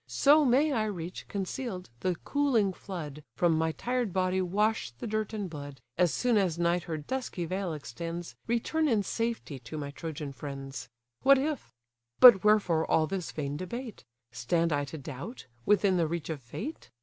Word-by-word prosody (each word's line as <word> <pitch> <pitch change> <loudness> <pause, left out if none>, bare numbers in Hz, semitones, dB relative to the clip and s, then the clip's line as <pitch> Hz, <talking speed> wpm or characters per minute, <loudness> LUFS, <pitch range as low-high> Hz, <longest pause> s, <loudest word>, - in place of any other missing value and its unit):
So 295 +2 +5
may 280 +4 +4
I 220 -4 +1
reach, 180 -4 -5
conceal'd, 195 - -4
the 180 +4 0
cooling 250 -9 +2
flood, 155 -7 -7
From 170 -2 +3
my 160 0 +1
tired 245 +3 -1
body 185 +1 +1
wash 210 - +1
the 120 +1 -9
dirt 215 -1 -1
and 210 -3 -3
blood, 145 -4 -8 0.2
As 175 -2 +3
soon 245 -3 +2
as 180 -4 +1
night 170 0 +1
her 160 -2 -3
dusky 185 - -3
veil 185 +1 -2
extends, 165 +4 -6
Return 270 +7 +1
in 220 -7 +2
safety 230 - -3
to 120 +5 -8
my 140 -1 -4
Trojan 150 -2 -6
friends. 135 -2 -7 0.3
What 275 0 +7
if?—But 120 - +4
wherefore 200 -7 +3
all 160 - +4
this 185 0 -4
vain 145 -1 -3
debate? 230 - -6 0.3
Stand 165 +6 +1
I 145 0 0
to 150 +3 -7
doubt, 145 - -7 0.2
within 200 -2 +4
the 165 -2 +2
reach 165 0 -3
of 150 -3 -5
fate? 220 - -7
180 Hz, 170 wpm, -30 LUFS, 155-220 Hz, 0.3 s, What